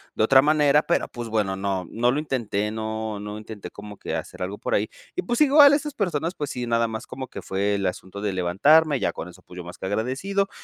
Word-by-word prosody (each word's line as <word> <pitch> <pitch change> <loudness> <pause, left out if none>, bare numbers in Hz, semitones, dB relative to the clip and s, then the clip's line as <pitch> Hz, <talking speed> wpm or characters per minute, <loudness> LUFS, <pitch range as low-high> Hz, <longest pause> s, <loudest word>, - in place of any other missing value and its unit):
de - - +2
otra 130 +4 +7
manera, 150 -1 +4
pero, 170 - 0
pues, 120 -2 -7
bueno, 105 -3 0
no, 95 -1 -2
no 120 +2 +1
lo 140 - 0
intenté, 115 -8 -2
no 110 -1 -4
no 105 +1 -6
intenté 110 -1 -9
como 105 0 -10
que - - -4
hacer - - -5
algo 95 +3 -4
por - - -1
ahí, 105 - +1 0.3
y 365 - -1
pues 240 +3 -1
igual 290 -1 +8
estas 295 0 -1
personas, 170 -3 -1
pues, 145 -2 -4
sí, 125 -1 -4
nada 115 0 +2
más 110 0 -6
como 130 0 -6
que - - -8
fue 100 +2 -1
el 100 -1 -2
asunto 95 +2 -6
de 105 -1 -1
levantarme, 140 - +4
ya 85 - 0
con 85 - -7
eso, 90 - -14
pues, 90 - -14
yo 90 - -6
más 85 +1 -10
que 95 - -4
agradecido, 135 - -1
110 Hz, 245 wpm, -24 LUFS, 100-150 Hz, 0.3 s, igual